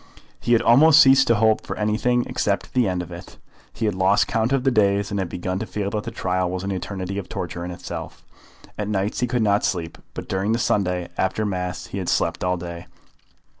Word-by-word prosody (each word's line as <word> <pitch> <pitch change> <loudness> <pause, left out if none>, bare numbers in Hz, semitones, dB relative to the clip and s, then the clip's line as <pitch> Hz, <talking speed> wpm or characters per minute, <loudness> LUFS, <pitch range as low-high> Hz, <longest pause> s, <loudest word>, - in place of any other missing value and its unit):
He 120 - +1
had 115 - +3
almost 150 +6 +7
ceased 135 -2 +6
to 115 - +4
hope 110 0 +3
for - - -6
anything 115 +3 +1
except 100 -1 -2
the 125 -4 +2
end 90 -1 -1
of 85 - -11
it. - - -10 0.3
He 115 - -3
had 105 - +1
lost 95 +2 +3
count 115 +1 0
of 135 -2 +1
the 135 - +3
days, 100 -2 +2
and 100 - -1
had 95 -2 -2
begun 90 +2 -3
to 110 - -4
feel 100 +1 -3
that 105 -1 -3
the - - -3
trial 90 0 -1
was 90 +1 -4
an 100 - -2
eternity 95 +1 -4
of 95 - -8
torture 85 0 -5
in 90 - -5
itself. 90 - -8 0.5
At 105 - -2
nights 100 0 -1
he 125 - +1
could 120 -1 0
not 100 -1 +2
sleep, 85 -3 -2 0.2
but - - -6
during 95 +3 0
the - - +1
Sunday, 90 -6 0
after 95 +3 0
Mass, 90 -2 -3
he 100 - -6
had 90 - -3
slept 85 +1 0
all 90 0 +1
day. 85 0 -8
100 Hz, 230 wpm, -23 LUFS, 90-110 Hz, 0.5 s, almost